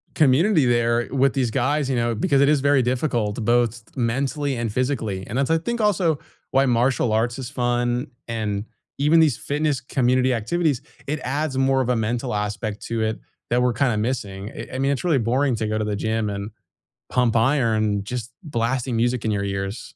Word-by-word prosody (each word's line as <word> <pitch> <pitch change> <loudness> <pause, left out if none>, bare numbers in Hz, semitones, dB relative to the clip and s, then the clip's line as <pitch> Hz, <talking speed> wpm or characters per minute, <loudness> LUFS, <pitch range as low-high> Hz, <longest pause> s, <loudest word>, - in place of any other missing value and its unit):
community 155 +3 +4
there 120 0 +2
with 135 0 +2
these 125 -4 0
guys, 140 +2 0
you 130 - +1
know, 120 -1 0
because 140 - +2
it 140 - +5
is 150 -2 +3
very 140 -1 +4
difficult 120 -4 -1
both 120 0 +1
mentally 135 +4 -1
and 115 -3 -2
physically, 115 -7 -2
and 120 - -4
that's, 140 +2 +1
I 165 - +4
think, 235 +7 -3
also 180 -7 +2 0.3
why 135 +1 +4
martial 120 -1 +2
arts 115 +3 +1
is 130 -2 -5
fun, 120 0 0 0.2
and 105 -3 -2 0.3
even 150 +4 +4
these 150 -8 +4
fitness 145 -2 -1
community 130 0 +1
activities, 135 +4 0 0.2
it 150 +2 -2
adds 140 +1 -2
more 135 0 +3
of 125 - -2
a 125 - +3
mental 115 +3 -1
aspect 105 0 -3
to 115 -1 -2
it 110 0 -1 0.3
that 120 +1 +2
we're 125 -1 +2
kinda 125 -3 +1
missing. 105 -4 -3
It - - -8
I 130 - -3
mean, 135 +1 +2
it's 140 - -2
really 165 -6 +2
boring 125 +3 +1
to 110 - -2
go 110 - -1
to 110 - 0
the 105 -1 -1
gym 110 0 -1
and 100 +1 -5 0.6
pump 125 -2 +2
iron 115 -5 +2
just 120 +3 -5
blasting 125 -3 -1
music 120 +1 0
in 110 - +1
your 100 -1 -1
ears. 100 +2 -3
125 Hz, 195 wpm, -23 LUFS, 115-135 Hz, 0.6 s, it